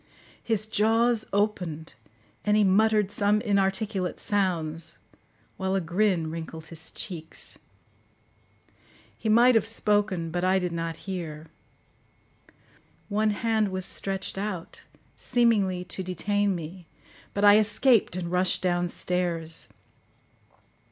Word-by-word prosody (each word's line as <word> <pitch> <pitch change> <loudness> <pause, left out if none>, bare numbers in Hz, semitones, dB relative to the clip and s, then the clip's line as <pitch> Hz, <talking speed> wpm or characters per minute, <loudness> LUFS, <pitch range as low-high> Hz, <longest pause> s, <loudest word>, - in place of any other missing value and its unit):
His 220 -2 -1
jaws 225 +1 +2
opened, 180 -6 -1 0.5
and 210 0 +3
he 210 - +4
muttered 210 +1 +3
some 205 +1 +2
inarticulate 195 -2 0
sounds, 170 -5 -1 0.6
while 190 0 -1
a - - +2
grin 175 -2 0
wrinkled 160 -1 -7
his 160 -1 -8
cheeks. 165 -5 -4 1.6
He 220 - -3
might 240 +3 +6
have 225 - +3
spoken, 205 -6 +1
but 175 +1 -2
I 185 +1 +3
did 180 -2 -1
not 165 -1 -3
hear; 165 -5 -6 1.6
one 215 +1 +1
hand 220 0 +1
was 185 -1 -3
stretched 195 0 -3
out, 195 -4 -5 0.4
seemingly 210 -7 +1
to 190 - -5
detain 200 +2 0
me, 170 +1 -8 0.5
but 200 +1 +2
I 205 +1 +8
escaped 220 -1 +3
and 175 -2 -4
rushed 180 0 +1
downstairs. 175 -2 0
190 Hz, 110 wpm, -26 LUFS, 175-210 Hz, 1.6 s, I